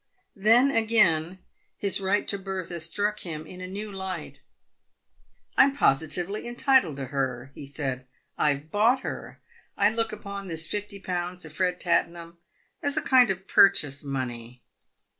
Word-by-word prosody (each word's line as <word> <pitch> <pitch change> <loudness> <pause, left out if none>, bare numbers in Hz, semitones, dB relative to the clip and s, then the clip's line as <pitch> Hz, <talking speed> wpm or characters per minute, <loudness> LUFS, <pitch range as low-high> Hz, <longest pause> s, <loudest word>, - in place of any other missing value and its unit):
Then, 230 +7 +4
again, 190 - +2 0.4
his 200 -1 +3
right 195 +2 0
to 200 - +4
Bertha 185 -3 -5
struck 205 +6 +2
him 155 -3 -7
in 180 +3 -11
a 185 - -6
new 205 +3 -6
light. 190 -1 -6 0.6
" - - -40
I'm 275 +1 +5
positively 175 - +1
entitled 240 - +2
to 135 -1 -5
her," 130 -1 -3
he 140 - -10
said. 135 -3 -4
" - - -46
I've 150 +1 -1
bought 235 +6 +3
her. - - -7 0.4
I 205 +1 +4
look 225 0 0
upon 200 -2 -7
this 165 -2 +4
fifty 205 +3 -5
pounds 180 -1 -4
to 160 - -9
Fred 180 +2 -1
Tattenham 170 0 -1 0.4
as 285 +1 0
a - - 0
kind 255 -2 +5
of 190 0 -4
purchase 145 -7 +4
money. 125 -3 -6
185 Hz, 155 wpm, -26 LUFS, 155-210 Hz, 0.6 s, I'm